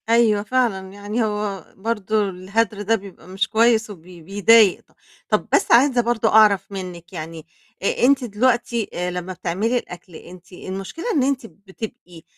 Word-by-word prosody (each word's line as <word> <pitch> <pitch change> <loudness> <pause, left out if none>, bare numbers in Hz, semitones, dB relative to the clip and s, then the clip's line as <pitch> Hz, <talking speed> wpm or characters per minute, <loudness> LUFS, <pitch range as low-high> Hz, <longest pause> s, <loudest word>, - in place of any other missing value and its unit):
أيوة 225 -3 +3
فعلًا، 210 -6 -1
يعني 205 +3 -3
هو 210 -2 -3
برضو 215 0 -1
الهدر 200 +3 -2
ده 220 +3 +2
بيبقى 195 -4 -11
مش 190 +2 -2
كويس 225 0 +3
وبي 180 -2 -12
بيضايق 205 +3 +4
ط - - -33 0.3
طب - - 0
بس - - +1
عايزة 250 +1 +5
برضو 235 -1 0
أعرف 205 -3 +4
منِك، 180 -3 -8
يعني 160 -1 -7 0.4
أ 200 - +1
أنتِ 270 0 +3
دلوقتي، 235 0 0
آآ، 180 +1 -2
لمّا 180 +1 -5
بتعملي 195 +7 -1
الأكل، 180 -5 -9
أنتِ 180 +2 -13
المشكلة 195 - -7
إن 280 - +3
أنتِ 265 -2 -1
بتبقي 190 -2 -10
205 Hz, 155 wpm, -21 LUFS, 185-230 Hz, 0.4 s, عايزة